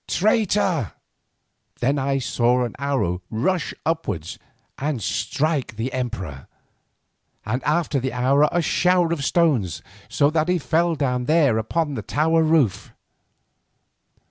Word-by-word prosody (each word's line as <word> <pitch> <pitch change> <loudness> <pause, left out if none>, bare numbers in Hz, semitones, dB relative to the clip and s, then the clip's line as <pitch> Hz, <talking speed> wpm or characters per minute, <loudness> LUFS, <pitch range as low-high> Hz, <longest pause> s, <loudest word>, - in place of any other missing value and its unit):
Traitor!"_ 195 - +1 0.9
Then 135 +4 +1
I 135 +1 0
saw 125 0 +1
an 120 - -4
arrow 130 -11 -1
rush 155 +10 -1
upwards 105 - -3 0.4
and 145 -2 -1
strike 125 - -1
the 115 +4 -4
emperor, 100 - -5 1.0
and 125 +5 -2
after 150 -2 +1
the 130 +1 -2
arrow 135 +4 +3
a 175 -1 +1
shower 180 0 +2
of 150 -4 -3
stones, 120 - +1 0.3
so 140 +6 +2
that 160 +1 0
he 180 - +3
fell 165 +2 +1
down 125 -4 -1
there 145 -7 +3
upon 150 +7 -1
the - - -4
tower 160 +2 +1
roof. 155 - +1
140 Hz, 125 wpm, -22 LUFS, 120-165 Hz, 1.0 s, arrow